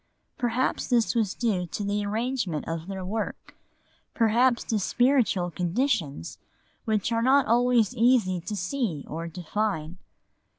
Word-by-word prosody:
Perhaps 245 +1 -1
this 240 -3 +2
was 220 -5 0
due 200 -7 0
to 205 - -4
the 205 +1 -1
arrangement 215 - -2
of 165 +1 -4
their 190 -1 -5
work, 210 +3 -4 0.6
perhaps 235 +2 +3
to 220 - -1
spiritual 240 -5 +2
conditions 175 - -1 0.5
which 215 0 0
are 230 0 +1
not 270 +3 +4
always 240 -1 +3
easy 225 -7 +3
to 210 +5 -5
see 190 - -2
or 165 +2 -5
define. 175 0 -3
215 Hz, 130 wpm, -26 LUFS, 180-240 Hz, 0.6 s, not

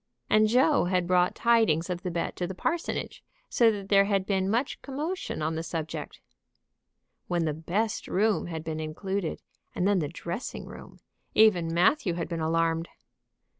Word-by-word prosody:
And 215 0 +5
Joe 255 - +4
had 180 0 +1
brought 180 0 +2
tidings 220 -9 +3
of 180 -1 -3
the 180 - -3
bet 170 -1 -3
to 175 - -2
the 190 - -6
parsonage, 330 - -3 0.3
so 235 -2 +4
that 200 -3 -4
there 200 -1 +5
had 195 -2 +1
been 190 -1 0
much 240 +6 -1
commotion 295 - -4
on 160 +1 0
the 160 - -2
subject. 160 -1 -5 1.1
When 175 -2 0
the 155 - 0
best 190 +8 -2
room 210 -1 +1
had 160 -2 -5
been 160 -1 -4
included, 175 +3 -3 0.3
and 180 - +1
then 200 -2 +3
the 150 - -1
dressing 170 - -6
room, - - -11 0.4
even 185 -7 +4
Matthew 180 - +3
had 170 - -3
been 165 -2 -3
alarmed. 165 +1 0
180 Hz, 170 wpm, -28 LUFS, 165-215 Hz, 1.1 s, And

